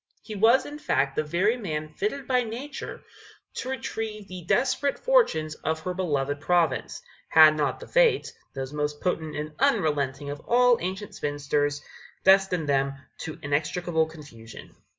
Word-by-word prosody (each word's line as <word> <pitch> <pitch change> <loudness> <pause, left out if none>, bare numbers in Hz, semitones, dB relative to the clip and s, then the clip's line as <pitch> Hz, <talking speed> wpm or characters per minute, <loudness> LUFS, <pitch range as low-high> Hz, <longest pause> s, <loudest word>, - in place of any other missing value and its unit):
He 220 - -8
was 225 +5 +4
in 295 +1 -8
fact 135 - 0
the - - +1
very 185 +10 +1
man 155 -8 -4
fitted 240 - -3
by 255 -1 +3
nature 245 +5 -6 0.5
to 255 - -5
retrieve 220 -5 -4
the 185 -1 -8
desperate 265 +5 +1
fortunes 455 - +2
of 160 +1 -3
her 180 +3 -3
beloved 145 -6 -1
province, 175 +1 0 0.3
had 155 -1 +8
not 145 -4 -1
the - - -10
Fates, - - +3 0.2
those 135 +1 -5
most 150 0 -2
potent 160 -4 -2
and 150 +1 -4
unrelenting 145 -2 +1
of 145 - -6
all 245 +6 +3
ancient 190 +4 -4
spinsters, 145 0 -1 0.4
destined 190 -4 +4
them 140 -1 +1 0.3
to 160 - -6
inextricable 160 +3 0
confusion. 145 -8 -12
160 Hz, 150 wpm, -26 LUFS, 145-220 Hz, 0.5 s, had